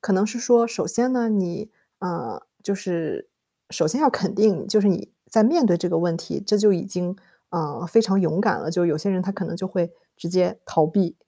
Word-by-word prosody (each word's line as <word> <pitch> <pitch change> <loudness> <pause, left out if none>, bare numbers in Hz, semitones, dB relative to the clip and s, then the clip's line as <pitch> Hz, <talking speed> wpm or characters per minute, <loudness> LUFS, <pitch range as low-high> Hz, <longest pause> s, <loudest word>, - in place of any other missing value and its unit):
可 200 - -1
能 195 +3 +3
是 230 +3 -5
说， 235 0 +4
首 230 +1 -3
先 250 +2 +2
呢， 235 -2 +1
你， 200 +1 -2 0.3
啊， 180 -3 -5 0.2
就 200 - -1
是 190 - -4 0.4
首 - - 0
先 255 - +1
要 295 - +6
肯 195 -5 -2
定 210 -1 +2
就 215 +1 +4
是 205 - +3
你 180 -3 -1 0.2
在 220 - +5
面 295 +4 +4
对 175 -4 +3
这 180 +1 -2
个 165 -2 +1
问 170 -1 0
题， 170 - -6
这 210 0 +3
就 210 0 +5
已 175 -3 -1
经， 180 -1 -3 0.3
啊， 165 -1 -4
非 225 +7 +5
常 195 -3 +2
勇 165 +2 0
敢 210 -1 +1
了。 160 - -4
就 175 0 +1
有 155 -3 +1
些 175 +6 -2
人 185 -1 0
他 195 +2 -3
可 195 -1 -5
能 170 - -5
就 190 - -4
会 175 -3 -2 0.2
直 170 - -7
接 180 0 +1
逃 160 -2 +2
避， 170 +1 0
190 Hz, 260 characters per minute, -23 LUFS, 175-215 Hz, 0.4 s, 要